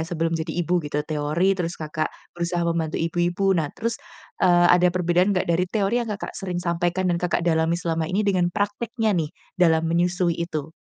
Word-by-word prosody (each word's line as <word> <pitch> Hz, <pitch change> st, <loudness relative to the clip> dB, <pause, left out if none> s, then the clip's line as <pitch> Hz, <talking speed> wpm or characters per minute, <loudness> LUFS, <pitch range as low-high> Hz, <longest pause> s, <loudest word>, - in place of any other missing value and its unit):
sebelum 165 Hz, -1 st, -1 dB
jadi 165 Hz, 0 st, -2 dB, 0.2 s
ibu, 175 Hz, +1 st, +1 dB
gitu. 150 Hz, -1 st, -3 dB
Teori, 155 Hz, +5 st, +1 dB
terus 180 Hz, -3 st, -3 dB
Kakak 155 Hz, 0 st, -3 dB, 0.2 s
berusaha 170 Hz, 0 st, -2 dB
membantu 165 Hz, -2 st, -1 dB
ibu 165 Hz, +1 st, -2 dB
ibu. 175 Hz, +3 st, 0 dB
Nah 165 Hz, -5 st, 0 dB
terus, 230 Hz, +1 st, -3 dB, 0.4 s
eee, 175 Hz, -1 st, +5 dB
ada 180 Hz, 0 st, +5 dB
perbedaan 180 Hz, +2 st, +2 dB
nggak 180 Hz, -, +1 dB
dari 170 Hz, +1 st, +1 dB
teori 210 Hz, +3 st, 0 dB
yang 235 Hz, -, -4 dB
Kakak 205 Hz, -2 st, -5 dB
sering 185 Hz, -2 st, -5 dB
sampaikan 175 Hz, +1 st, 0 dB
dan 170 Hz, -, -1 dB
Kakak 175 Hz, -1 st, 0 dB
dalami 165 Hz, 0 st, +2 dB
selama 165 Hz, -2 st, -2 dB
ini, 205 Hz, +3 st, 0 dB
dengan 185 Hz, -3 st, +2 dB
prakteknya 210 Hz, +4 st, -1 dB
nih 165 Hz, -5 st, 0 dB, 0.3 s
dalam 165 Hz, -2 st, +4 dB
menyusui 175 Hz, +1 st, +1 dB
itu? 160 Hz, -2 st, -4 dB
175 Hz, 190 wpm, -24 LUFS, 165-185 Hz, 0.4 s, eee